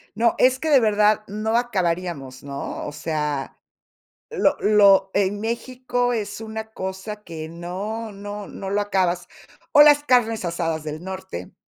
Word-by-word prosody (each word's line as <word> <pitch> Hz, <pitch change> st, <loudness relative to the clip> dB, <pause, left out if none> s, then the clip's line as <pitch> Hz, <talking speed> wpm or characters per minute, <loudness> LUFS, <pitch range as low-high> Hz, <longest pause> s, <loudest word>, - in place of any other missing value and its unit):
No, 230 Hz, +2 st, +2 dB
es 255 Hz, +1 st, +4 dB
que 320 Hz, -, -2 dB
de 280 Hz, -3 st, +7 dB
verdad 215 Hz, -1 st, +3 dB
no 215 Hz, +3 st, -1 dB
acabaríamos, 175 Hz, -, -2 dB
¿no? 140 Hz, 0 st, -5 dB
O 150 Hz, -, -5 dB
sea, 150 Hz, -2 st, -3 dB, 0.7 s
lo 390 Hz, -10 st, +2 dB
lo 200 Hz, -2 st, +5 dB
en 200 Hz, +1 st, 0 dB
México 245 Hz, +2 st, -1 dB
es 205 Hz, -2 st, -3 dB
una 220 Hz, 0 st, -6 dB
cosa 190 Hz, +2 st, -5 dB
que 160 Hz, -2 st, -7 dB
no, 200 Hz, +6 st, -5 dB
no, 205 Hz, +1 st, -7 dB
no 195 Hz, 0 st, -7 dB
lo 205 Hz, +1 st, +1 dB
acabas. 185 Hz, -3 st, 0 dB, 0.5 s
O 295 Hz, -, +9 dB
las 295 Hz, 0 st, +6 dB
carnes 230 Hz, -6 st, +2 dB
asadas 165 Hz, -2 st, -2 dB
del 155 Hz, +1 st, -6 dB
norte. 185 Hz, -, -7 dB
205 Hz, 150 wpm, -23 LUFS, 175-225 Hz, 0.7 s, O